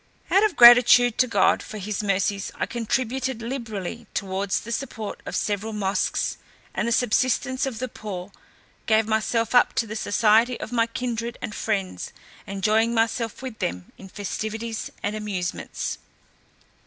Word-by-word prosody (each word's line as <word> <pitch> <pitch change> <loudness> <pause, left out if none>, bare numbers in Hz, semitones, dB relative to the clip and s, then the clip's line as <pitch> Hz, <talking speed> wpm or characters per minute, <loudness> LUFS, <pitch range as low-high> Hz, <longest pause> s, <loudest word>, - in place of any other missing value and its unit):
Out 390 - +5
of 425 -5 +2
gratitude 240 0 +8
to 255 - +5
God 200 -5 +3
for 215 - -8
his 205 +1 -3
mercies, 200 0 0
I - - -1
contributed 250 +1 -2
liberally 230 -3 -5
towards 195 0 -1
the 235 - -8
support 225 -4 -4
of - - -4
several 210 +1 -1
mosques, 200 -2 -1 0.4
and - - -1
the - - 0
subsistence 255 +3 +1
of 250 -4 -4
the 255 +3 -3
poor, 200 -5 -7 0.6
gave 220 -1 +3
myself 225 +2 0
up 245 - +5
to 230 - 0
the 215 0 -6
society 225 +3 +3
of - - -6
my 230 -1 +2
kindred 235 0 -4
and 210 - -5
friends, 195 - -3 0.3
enjoying 220 +4 +1
myself 225 +1 -1
with 255 -4 -7
them 90 +1 -4
in 195 - -12
festivities 220 +3 -4
and 205 +1 -1
amusements. 200 -4 -4
220 Hz, 150 wpm, -24 LUFS, 205-235 Hz, 0.6 s, gratitude